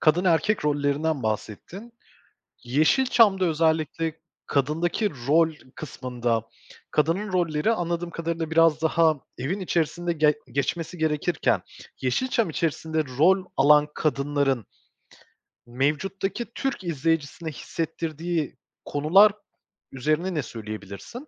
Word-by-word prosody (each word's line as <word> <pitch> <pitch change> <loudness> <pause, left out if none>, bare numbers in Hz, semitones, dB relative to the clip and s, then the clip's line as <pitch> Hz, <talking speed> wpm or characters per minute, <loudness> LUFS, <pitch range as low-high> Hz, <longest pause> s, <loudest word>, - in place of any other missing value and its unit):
kadın 170 +4 +3
erkek 175 +3 +2
rollerinden 145 0 0
bahsettin. 110 - -5 0.7
Yeşilçam'da 190 - +3
özellikle 160 0 0 0.3
kadındaki 165 - 0 0.2
rol 160 +2 +4 0.2
kısmında 120 -6 -2 0.5
kadının 185 +7 0
rolleri, 170 +1 +1
anladığım 175 -4 -2
kadarıyla, 165 -1 -3
biraz 160 -1 +4
daha 160 -1 +3 0.2
evin 145 +11 -2
içerisinde 170 -1 -1
ge 150 -2 +3 0.2
geçmesi 160 +6 -2
gerekirken 160 +1 +1 0.4
Yeşilçam 225 - 0
içerisinde 160 0 -1
rol 185 +5 +4
alan 150 +2 +6
kadınların, 140 - 0 1.0
mevcuttaki 150 - -1
Türk 270 -7 -2
izleyicisine 165 0 -1
hissettirdiği 165 +1 -3 0.3
konular 175 +9 +5 0.6
üzerine 155 +8 -1
ne 150 -4 -1
söyleyebilirsin? 110 - -8
160 Hz, 95 wpm, -25 LUFS, 145-175 Hz, 1.0 s, alan